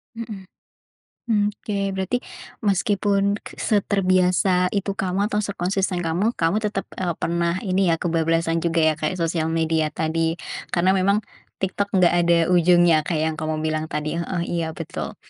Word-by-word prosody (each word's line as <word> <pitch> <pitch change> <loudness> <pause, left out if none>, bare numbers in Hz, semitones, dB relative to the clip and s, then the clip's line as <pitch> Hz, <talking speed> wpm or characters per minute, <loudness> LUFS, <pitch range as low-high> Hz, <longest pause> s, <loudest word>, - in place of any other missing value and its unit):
Mhm. 220 -4 -7 0.8
Mmm, 210 -3 +1
oke, 200 -2 -3
berarti 190 +6 -1 0.4
meskipun 200 0 +1 0.2
seterbiasa 185 -3 +2
itu 200 0 0
kamu 195 +2 -1
atau 210 - +1
sekonsisten 195 -2 -1
kamu, 180 +8 0
kamu 165 +6 +1
tetap, 210 -2 -2 0.2
eee, 175 -3 -1
pernah 170 +1 0
ini 190 -2 +1
ya 165 - +3
kebablasan 165 0 0
juga 165 -1 +1
ya 155 0 +4
kayak 155 +4 -1
sosial 165 -2 -1
media 160 -1 +1
tadi. 160 +2 -1 0.3
Karena 180 +2 +2
memang 200 +2 +2 0.4
TikTok 200 +1 -1
enggak 180 -2 +4
ada 170 0 +3
ujungnya 175 -3 +4
kayak 160 -3 0
yang 155 - -10
kamu 155 0 -2
bilang 155 0 -1
tadi 150 +2 -3
heeh, 170 +1 -2
iya, 170 -1 -2
betul. 165 - -6
180 Hz, 150 wpm, -23 LUFS, 165-195 Hz, 0.8 s, ya